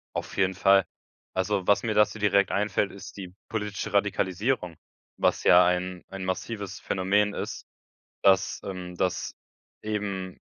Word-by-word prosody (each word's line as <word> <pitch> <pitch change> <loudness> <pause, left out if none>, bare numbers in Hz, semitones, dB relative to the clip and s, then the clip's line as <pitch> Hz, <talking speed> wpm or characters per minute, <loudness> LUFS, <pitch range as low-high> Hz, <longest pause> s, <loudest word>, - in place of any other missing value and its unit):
Auf - - -5
jeden 95 -1 +2
Fall. 95 0 +5 0.5
Also, 95 0 -1
was 100 - +4
mir 110 -2 0
dazu 105 +1 +3
direkt 100 -1 +3
einfällt, 100 -1 0
ist 100 - -11
die 90 -2 -8 0.2
politische 105 -1 -3
Radikalisierung, 100 -1 0 0.4
was - - +1
ja 90 0 +7
ein 90 0 -1
ein 95 -1 -6
massives 100 +1 -4
Phänomen 100 +2 +1
ist, - - -5 0.6
dass, 95 -1 +3
ähm 90 -2 -6
dass 95 -1 -1 0.5
eben 100 -3 -3
95 Hz, 135 wpm, -27 LUFS, 95-105 Hz, 0.6 s, ja